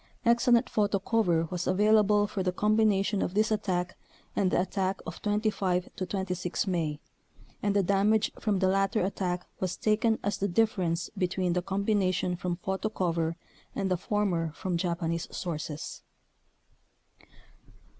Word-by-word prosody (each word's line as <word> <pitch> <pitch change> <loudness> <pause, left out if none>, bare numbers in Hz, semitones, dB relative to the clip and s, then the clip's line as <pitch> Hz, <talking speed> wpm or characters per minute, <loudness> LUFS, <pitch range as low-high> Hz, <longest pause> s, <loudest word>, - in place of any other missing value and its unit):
Excellent 235 0 +4
photo 205 -1 +1
cover 185 -5 +1
was 180 0 -3
avail 210 +4 +4
able 210 0 +3
for 200 -1 -3
the 180 -1 +1
combination 210 0 +2
of 180 - -2
this 215 +1 +2
attack 185 -4 -1 0.4
and 190 - +2
the - - +2
attack 190 +1 -1
of 165 - -7
25 205 -4 0
26 185 -1 -2
May, 165 -6 -1 0.6
and 205 -1 0
the 200 - +4
damage 205 +3 +2
from 210 -3 +1
the 190 0 +2
latter 195 +2 +2
attack 180 -2 -2
was 185 -2 -2
taken 220 +1 +2
as 205 - -1
the 200 - +1
difference 180 -4 0
be 185 -2 +1
tween 180 -1 -1
the 180 - +1
combination 190 -2 0
from 175 0 -2
photo 190 +4 -2
cover 165 -5 -1 0.4
and 195 -2 -1
the - - +4
former 180 -4 -1
from 180 +1 -3
Japanese 170 -1 -1
sources. 155 -3 -5
190 Hz, 145 wpm, -29 LUFS, 180-210 Hz, 0.6 s, Excellent